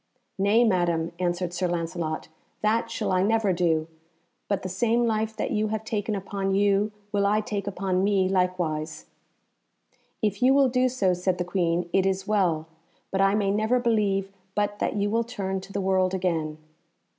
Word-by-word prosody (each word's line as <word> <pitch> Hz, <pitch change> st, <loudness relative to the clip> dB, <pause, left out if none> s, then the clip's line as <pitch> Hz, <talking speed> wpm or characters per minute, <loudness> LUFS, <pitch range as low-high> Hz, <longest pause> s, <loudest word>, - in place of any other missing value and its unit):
"Nay, 205 Hz, +4 st, +4 dB
Madam," 175 Hz, -6 st, +1 dB
answered 175 Hz, 0 st, -1 dB
Sir 180 Hz, +1 st, 0 dB
Lancelot, 165 Hz, -2 st, -3 dB, 0.4 s
"that 220 Hz, +2 st, +1 dB
shall 205 Hz, -3 st, -2 dB
I 185 Hz, 0 st, +3 dB
never 210 Hz, -1 st, +2 dB
do; 165 Hz, -3 st, +1 dB, 0.6 s
but 200 Hz, -, -1 dB
the -, -, -2 dB
same 230 Hz, +6 st, +1 dB
life 220 Hz, -1 st, -1 dB
that -, -, -2 dB
you 215 Hz, +1 st, +1 dB
have 220 Hz, 0 st, -3 dB
taken 215 Hz, -1 st, -2 dB
upon 195 Hz, 0 st, -2 dB
you, 205 Hz, +1 st, +2 dB, 0.2 s
will 200 Hz, -1 st, +2 dB
I 210 Hz, +1 st, +3 dB
take 205 Hz, -2 st, -4 dB
upon 190 Hz, -1 st, 0 dB
me 195 Hz, -2 st, +2 dB
likewise." 180 Hz, -5 st, -1 dB, 1.1 s
"If 205 Hz, -2 st, -1 dB
you 260 Hz, +2 st, +5 dB
will 275 Hz, -2 st, +5 dB
do 255 Hz, +1 st, +2 dB
so," 200 Hz, -8 st, +1 dB
said 180 Hz, +1 st, 0 dB
the 180 Hz, -, -2 dB
Queen, 175 Hz, -1 st, 0 dB
"it 195 Hz, 0 st, +3 dB
is 190 Hz, 0 st, -1 dB
well; 180 Hz, -7 st, +1 dB, 0.5 s
but 195 Hz, -, +1 dB
I 195 Hz, +1 st, +4 dB
may 200 Hz, -2 st, +1 dB
never 220 Hz, +5 st, +2 dB
believe 205 Hz, -5 st, +1 dB, 0.2 s
but 205 Hz, 0 st, -1 dB
that -, -, -1 dB
you 205 Hz, 0 st, 0 dB
will 230 Hz, +1 st, +2 dB
turn 195 Hz, -5 st, -3 dB
to 195 Hz, -, -12 dB
the 200 Hz, -, -2 dB
world 190 Hz, -1 st, +2 dB
again." 165 Hz, -4 st, -1 dB
195 Hz, 180 wpm, -26 LUFS, 180-215 Hz, 1.1 s, you